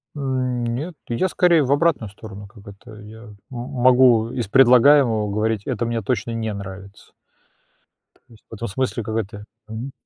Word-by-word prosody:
М, 130 -3 -2
нет, 140 +9 -4
я 120 +11 -1
скорее 170 -3 +3
в 130 - -2
обратную 145 -7 +1
сторону. 105 0 -11
Как 105 0 -17
это, 105 +3 -13
я 110 +2 -12
м 105 -3 -13
могу 125 -2 +3
из 120 -4 -4
предлагаемого 125 -2 +5
говорить: 110 0 -1
это 120 -3 -2
мне 115 0 -2
точно 110 +1 -2
не 110 -1 -3
нравится. 100 0 -10 1.0
То - - -31
есть 115 -3 -20
в - - -13
этом 115 +2 -5
смысле, 120 +2 -3
какая-то 105 -1 -5 0.2
мгм. 110 +5 -7
115 Hz, 160 wpm, -21 LUFS, 105-130 Hz, 1.0 s, предлагаемого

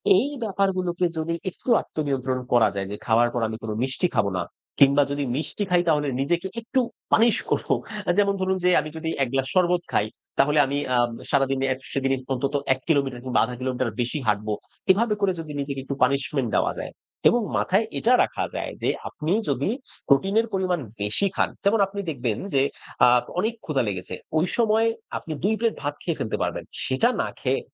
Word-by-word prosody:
এই 220 +9 +3 0.2
ব্যাপারগুলোকে 185 -4 0
যদি 160 +1 -1 0.2
একটু 185 - -9
আত্মনিয়ন্ত্রণ 135 -4 -2
করা 120 -2 +6
যায় 95 -1 -2
যে 105 - -3
খাওয়ার 120 +1 +4
পর 120 - -1
আমি 110 0 -5
কোনো 110 -1 -3
মিষ্টি 130 +7 0
খাবো 105 -3 +3
না। 90 - 0 0.4
কিংবা 140 +1 +6
যদি 145 0 -1
মিষ্টি 160 +8 -2
খাই, 180 -1 +4
তাহলে 150 -2 +2
নিজেকে 170 +6 0
একটু 245 +3 0 0.3
পানিশ 230 0 +5
করব। - - 0 0.4
অ্যা 175 - +2
যেমন 200 -1 +3
ধরুন 190 0 +1
যে 180 - +4
আমি 155 - -6
যদি 160 0 -3
১ - - 0
গ্লাস 135 -1 +1
শরবত 180 -1 +3
খাই, 105 - +2 0.3
তাহলে 150 +2 +4
আমি 140 +1 -2 0.2
আ - - +4 0.3
সারাদিনে, 135 -1 +2
অ্যা 130 - +1 0.2
সেদিনই 135 -1 +1 0.2
অন্তত 135 +2 -1 0.2
১ 130 - -9
কিলোমিটার 140 -6 +1
কিংবা 130 -1 +1
১/৫ 125 - -6
কিলোমিটার 130 -1 -1
বেশি 120 +5 -1
হাঁটব। 105 +1 +1 0.4
এভাবে 215 +3 +2
করে 195 -2 +3
যদি 155 -2 -6
নিজেকে 140 -1 -4
একটু 140 +1 -4
পানিশমেন্ট 135 -1 +1
দেওয়া - - +2
যায়, - - -5 0.4
এবং 240 - +2 0.2
মাথায় 195 +4 +2
এটা 240 - +3
রাখা - - -2
যায় - - -3
যে - - +2 0.2
আপনি 155 +1 -4 0.2
যদি 140 +4 0 0.4
প্রোটিনের 195 +11 +4
পরিমাণ 185 -2 +1 0.2
বেশি 105 - +1
খান। - - +2 0.2
যেমন 210 +2 +4
আপনি 200 +1 -7
দেখবেন 120 -7 -2 0.2
যে 135 - +4 0.4
আ - - +7 0.3
অনেক 220 +5 +1
ক্ষুধা 140 -5 +1
লেগেছে। 95 -2 -4 0.2
ওই 160 - +3
সময় 225 -1 +3 0.3
আপনি 160 - -6
২ 210 - +3
প্লেট 230 -1 +1
ভাত 145 0 -2
খেয়ে 170 -3 -1
ফেলতে 110 - -2
পারবেন। - - -3 0.2
সেটা - - +2
না - - -1
খেয়ে - - +1
145 Hz, 190 wpm, -24 LUFS, 130-185 Hz, 0.4 s, আ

